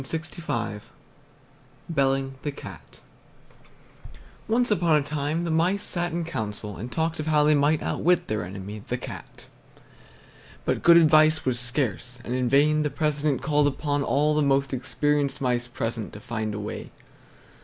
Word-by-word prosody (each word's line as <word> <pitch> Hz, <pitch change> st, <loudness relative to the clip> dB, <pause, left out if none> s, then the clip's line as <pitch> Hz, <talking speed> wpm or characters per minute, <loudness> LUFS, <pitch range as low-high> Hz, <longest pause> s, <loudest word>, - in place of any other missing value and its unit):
BELLING 135 Hz, -2 st, +1 dB
THE 145 Hz, -, -2 dB
CAT 140 Hz, -, -12 dB, 1.5 s
Once 240 Hz, +1 st, +1 dB
upon 170 Hz, -5 st, +3 dB
a 150 Hz, -, +3 dB
time 150 Hz, +3 st, -2 dB
the 170 Hz, -, -2 dB
mice 180 Hz, +6 st, +1 dB
sat 175 Hz, -1 st, -2 dB
in 170 Hz, 0 st, -2 dB
council 105 Hz, -8 st, -4 dB
and 115 Hz, +8 st, -7 dB
talked 160 Hz, 0 st, -1 dB
of 155 Hz, -, -3 dB
how 150 Hz, -1 st, +4 dB
they 150 Hz, +1 st, +5 dB
might 145 Hz, +1 st, +2 dB
outwit 175 Hz, +1 st, +1 dB
their 105 Hz, -3 st, -2 dB
enemy, 100 Hz, +3 st, -7 dB
the 125 Hz, -, -1 dB
Cat. 120 Hz, -, -9 dB, 1.2 s
But -, -, 0 dB
good 170 Hz, 0 st, +7 dB
advice 155 Hz, -1 st, +5 dB
was 125 Hz, -2 st, +1 dB
scarce, 125 Hz, -, -2 dB
and 120 Hz, -, -3 dB
in 125 Hz, -1 st, 0 dB
vain 150 Hz, +3 st, +4 dB
the 150 Hz, -, 0 dB
president 150 Hz, -2 st, -1 dB
called 150 Hz, -1 st, +3 dB
upon 145 Hz, +1 st, -1 dB
all 145 Hz, +2 st, +2 dB
the 150 Hz, -, +2 dB
most 140 Hz, -1 st, +2 dB
experienced 145 Hz, +2 st, 0 dB
mice 125 Hz, -2 st, 0 dB
present 115 Hz, -3 st, -4 dB
to 105 Hz, -, -8 dB
find 110 Hz, -1 st, -4 dB
a -, -, -4 dB
way. 105 Hz, +1 st, -6 dB
145 Hz, 155 wpm, -25 LUFS, 125-155 Hz, 1.5 s, good